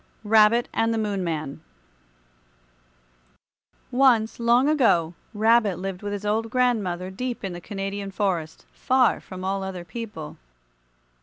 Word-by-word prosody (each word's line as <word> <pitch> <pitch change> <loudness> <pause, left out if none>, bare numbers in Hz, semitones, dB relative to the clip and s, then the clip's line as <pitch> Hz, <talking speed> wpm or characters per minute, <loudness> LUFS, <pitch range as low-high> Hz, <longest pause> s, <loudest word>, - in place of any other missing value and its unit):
RABBIT 220 +2 +4
AND 225 0 +1
THE 225 - 0
MOON 205 -3 -1
MAN 155 -4 -4 2.3
Once, 245 -4 +3
long 235 +3 +4
ago, 225 - +3 0.2
Rabbit 220 -3 +3
lived 190 0 -5
with 205 -1 -4
his 205 0 -5
old 220 +2 0
grandmother 205 -8 0
deep 245 +5 -4
in 190 -2 -3
the 175 - -8
Canadian 195 +1 -5
forest, 185 -5 -2
far 255 -1 +2
from 185 -1 -9
all 195 +1 -1
other 190 -2 -6
people. 170 -6 -7
205 Hz, 130 wpm, -24 LUFS, 185-230 Hz, 2.3 s, RABBIT